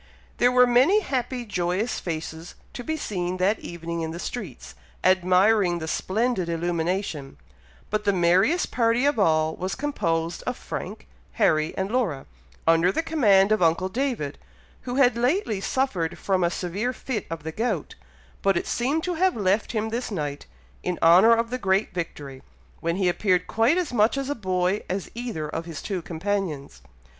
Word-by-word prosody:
There 245 +1 +4
were 250 0 +6
many 260 - +4
happy, 250 - -3
joyous 190 +2 -1
faces, 160 0 -6 0.2
to 245 - -6
be 315 +4 -2
seen 185 - -3
that 195 +4 +1
evening 170 0 -5
in 160 - -3
the 165 - -6
streets, 165 - -6 0.3
admiring 185 +1 +4
the 160 -1 -5
splendid 200 +1 -1
illumination; 170 -3 -2 0.5
but 210 0 0
the 205 - +3
merriest 185 - +2
party 235 +2 +2
of 285 -5 +2
all, 160 -4 +2
was 185 +1 -3
composed 170 - -1
of - - -2
Frank, - - -6 0.3
Harry, 155 0 +1
and 190 +2 -2
Laura, 205 - -1 0.4
under 165 +2 +4
the 325 - -1
command 210 -12 +4
of 215 - +2
uncle 170 +3 +2
David, 230 - -2 0.5
who 245 - -2
had 255 -3 +4
lately 245 - 0
suffered 195 -11 -1
from 190 -2 0
a 170 - +3
severe 195 +8 -2
fit 240 -5 -4
of 165 -2 -6
the 160 - -4
gout; 215 -4 -2 0.5
but 195 -2 +2
it - - -2
seemed 280 +7 0
to 360 - -1
have 370 +3 +2
left 205 0 +1
him 220 -2 -1
this 235 +3 -3
night, 145 -8 -4 0.3
in 180 -1 -2
honour 185 +8 +7
of 230 +1 -1
the 255 - -2
great 195 -1 +1
victory, 145 -6 -6 0.4
when 170 +1 -1
he 190 -1 +1
appeared 180 0 +1
quite 230 +9 +2
as 350 -8 -1
much 220 +3 +3
a 275 +1 -1
boy 185 -3 0
as 190 0 -3
either 230 -10 -4
of 165 +2 -5
his 165 -3 -7
two 190 -4 -3
companions. 165 -4 -3
195 Hz, 170 wpm, -25 LUFS, 170-240 Hz, 0.5 s, honour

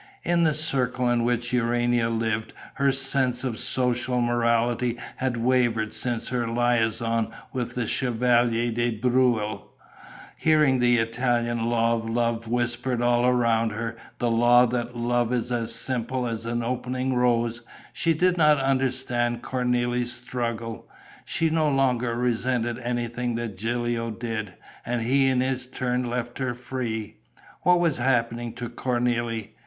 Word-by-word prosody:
In 170 -1 +2
the 155 -2 +2
circle 125 -5 0
in 120 -1 +1
which 120 +1 0
Urania 120 -1 +1
lived, 115 -1 -2 0.3
her 140 0 +4
sense 135 -2 +1
of 120 -4 -2
social 125 0 +1
morality 120 0 +1 0.2
had 130 -2 -1
wavered 115 -2 +1
since 120 -2 -1
her 120 -2 -1
liaison 115 -1 +1 0.2
with 120 -2 -3
the 125 -2 -1
Chevalier 120 0 +1
de 120 +1 0
Breuil. 120 -3 +1 0.7
Hearing 150 -5 +3
the 120 0 +4
Italian 120 0 0
law 115 0 +2
of 115 -1 -3
love 115 0 -1
whispered 120 +1 -1
all 120 0 +3
around 115 -3 +2
her, 115 +2 -4 0.2
the 120 -1 0
law 120 +2 +5
that 120 0 -3
love 120 0 0
is 125 0 -1
as 115 -1 -1
simple 125 +1 -1
as 115 -1 -4
an 120 0 -1
opening 125 +2 -2
rose, 120 -1 +1 0.3
she 165 -1 +1
did 180 +2 +2
not 150 -2 +5
understand 130 -3 0
Cornélie's 125 -1 0
struggle. 115 -2 -4 0.4
She 165 -1 0
no 155 -1 +2
longer 125 -4 +1
resented 120 0 0
anything 120 0 -2
that 115 -3 -4
Gilio 115 +2 -2
did; 110 -4 -5 0.3
and 120 0 -2
he 135 +3 +3
in 130 -1 +2
his 130 -1 -1
turn 125 -1 -2
left 120 +1 -4
her 130 -2 -2
free. 120 -3 -5 0.4
What 180 -1 +4
was 165 -7 +1
happening 120 -2 0
to 120 - -5
Cornélie? 120 -2 -1
120 Hz, 140 wpm, -25 LUFS, 115-125 Hz, 0.7 s, law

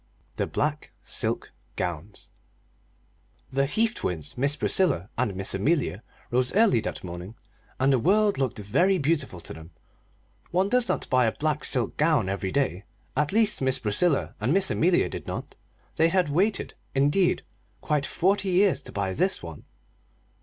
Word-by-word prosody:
The - - 0
Black 150 0 -2 0.2
Silk - - -3 0.2
Gowns 90 +3 -5 1.2
The 135 +1 +2
Heath 225 +9 +1
twins, 80 - -3
Miss 140 +3 +1
Priscilla 150 - +1
and 115 -6 -1
Miss 95 +1 0
Amelia, 115 - 0 0.3
rose 125 +1 +2
early 215 - +5
that - - -5
morning, 90 +4 -7 0.4
and 135 +1 +3
the 130 - +3
world 205 - +3
looked 130 -4 -1
very 140 - +2
beautiful 145 - -1
to - - -7
them 80 0 -11 0.8
one 185 +3 +1
does 250 +1 +2
not - - -1
buy 125 -2 +4
a - - +2
black 150 +2 -2
silk 125 -4 +1
gown 150 - +2
every 95 -1 -2
day; 115 -9 0 0.3
at 150 +2 +1
least, 215 -3 +2
Miss 130 -1 +1
Priscilla 135 +9 +1
and 115 +5 +1
Miss 190 +2 +4
Amelia 175 +2 +3
did - - -7
not. - - -6 0.4
They 165 +1 +4
had 180 -3 +1
waited, 190 +8 0 0.2
indeed, 145 +7 +2 0.4
quite 150 -2 0
forty 195 +2 +1
years 190 +1 +3
to - - -9
buy 100 -2 -2
this 185 - 0
one. 80 -3 -9
140 Hz, 160 wpm, -26 LUFS, -, 1.2 s, early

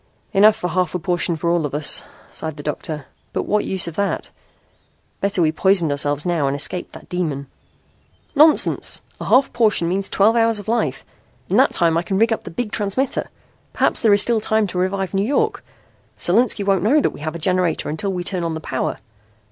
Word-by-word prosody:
"Enough 210 +2 +6
for - - -6
a 180 - -1
half 180 -1 0
portion 175 -1 0
for 170 +2 -1
all 170 -2 +1
of 145 -1 -3
us," 150 -1 +2 0.3
sighed 160 -1 -5
the 145 - -8
doctor. 150 0 -4 0.3
"But - - -1
what 210 0 0
use 190 -2 0
of 165 - -6
that? 200 -1 -2 0.9
Better 195 -3 0
we 155 - +2
poisoned 175 -2 +2
ourselves 145 +1 0
now 170 -5 0
and 135 - -1
escaped 175 +5 -2
that - - -12
demon." 155 -6 -3 0.9
"Nonsense. 305 +1 +3 0.2
A - - -6
half 260 +2 +3
portion 215 -7 +2
means 190 +3 -1
twelve 215 +4 +3
hours 230 -1 +3
of 205 - -8
life. 230 +1 -1 0.4
In - - +2
that - - +4
time 165 -1 +2
I - - -1
can 190 +2 -2
rig 225 +2 +3
up - - -6
the - - -6
big 215 +5 -4
transmitter. 210 +7 -1 0.4
Perhaps - - +3
there 225 - +4
is 205 0 +6
still 230 -2 0
time 220 0 +1
to 180 -2 -4
revive 190 +1 -1
New 195 - +1
York. 400 - 0 0.5
Solinski 210 +3 +2
won't 195 -2 +2
know 230 - +3
we 295 - 0
have 155 +2 -5
a - - -3
generator 180 0 0
until 160 +6 -2
we 180 -2 -3
turn 180 -1 -1
on 165 -1 -2
the - - -4
power. 130 -4 -3
185 Hz, 205 wpm, -20 LUFS, 165-210 Hz, 0.9 s, Enough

